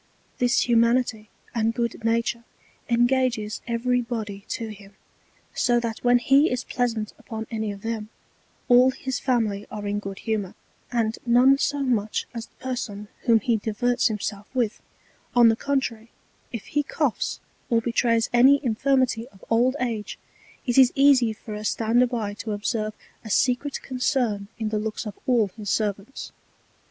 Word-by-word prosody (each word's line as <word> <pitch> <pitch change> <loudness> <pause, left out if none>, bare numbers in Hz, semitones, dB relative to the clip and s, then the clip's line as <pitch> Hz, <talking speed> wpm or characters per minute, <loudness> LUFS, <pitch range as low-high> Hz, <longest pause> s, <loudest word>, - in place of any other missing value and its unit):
This 245 -1 +3
Humanity 235 -2 +2 0.2
and 225 0 0
good 235 -2 -2
Nature 230 +1 0 0.5
engages 240 -2 +1
every 245 +1 +1
Body 215 -4 -5
to 225 -1 -3
him, 200 -1 -12 0.6
so 240 -1 +2
that 230 -2 -3
when 245 0 +5
he 275 +5 +4
is 250 0 -2
pleasant 230 -4 -2
upon 220 -1 -6
any 220 -2 -2
of 200 0 -10
them, 225 -2 -3 0.6
all 250 0 +6
his 260 -1 -3
Family 220 -6 0
are 210 -1 -6
in 205 0 -1
good 195 -1 -7
Humour, 210 -4 -3 0.4
and 230 -2 0
none 255 +3 +5
so 285 0 0
much 220 -5 0
as 230 -1 -6
the - - -36
Person 215 -5 -5 0.2
whom 225 -2 +5
he 230 +2 +2
diverts 240 +3 +1
himself 210 -2 -4
with: 235 -4 0 0.5
On 240 -1 +7
the 225 - +3
contrary, 235 -4 -2 0.4
if 230 -4 -6
he 295 - 0
coughs, 285 -3 -1 0.3
or 230 -2 +3
betrays 230 0 +1
any 265 +4 +6
Infirmity 250 0 +1
of 195 -7 -18
old 245 +4 +3
Age, 230 -4 -3 0.5
it 245 0 +3
is 255 -2 +7
easy 275 -4 +5
for 215 0 -9
a 210 0 -5
Stander 230 +3 +2
by 225 -4 -3
to 215 +1 -5
observe 215 +1 -2 0.3
a 220 - -8
secret 255 +6 +1
Concern 250 -6 -1
in 220 -2 -2
the 215 0 -1
Looks 220 +2 -4
of 210 - -5
all 235 -5 +3
his 210 -3 -6
Servants. 210 +4 -2
230 Hz, 160 wpm, -25 LUFS, 215-250 Hz, 0.6 s, On